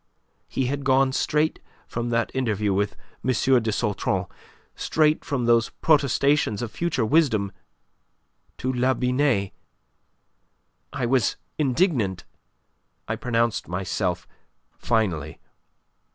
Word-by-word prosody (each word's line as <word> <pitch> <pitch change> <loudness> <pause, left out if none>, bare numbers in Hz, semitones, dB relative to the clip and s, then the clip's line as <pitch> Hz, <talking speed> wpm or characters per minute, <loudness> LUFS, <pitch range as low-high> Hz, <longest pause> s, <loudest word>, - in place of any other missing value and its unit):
He 135 - -1
had 140 +2 -2
gone 135 0 +3
straight 150 +3 0 0.3
from 120 0 -3
that 115 0 0
interview 105 -6 0
with 100 +1 0 0.3
M. - - -1 0.3
de 110 0 -1
Sautron, 105 -2 -1 0.5
straight 155 0 +1
from 135 -5 -2
those 115 -1 +3
protestations 140 -6 +2
of 115 - -5
future 155 -7 -1
wisdom, 110 -8 +2 1.1
to 130 +1 -2
La 130 +1 +2
Binet. 125 -5 +1 1.4
I 125 - -2
was 120 -3 +2 0.2
indignant. 125 - +1 0.8
I - - -1
pronounced 115 -2 0
myself 90 0 -2 0.5
finally. 85 -10 -1
120 Hz, 105 wpm, -24 LUFS, 105-135 Hz, 1.4 s, gone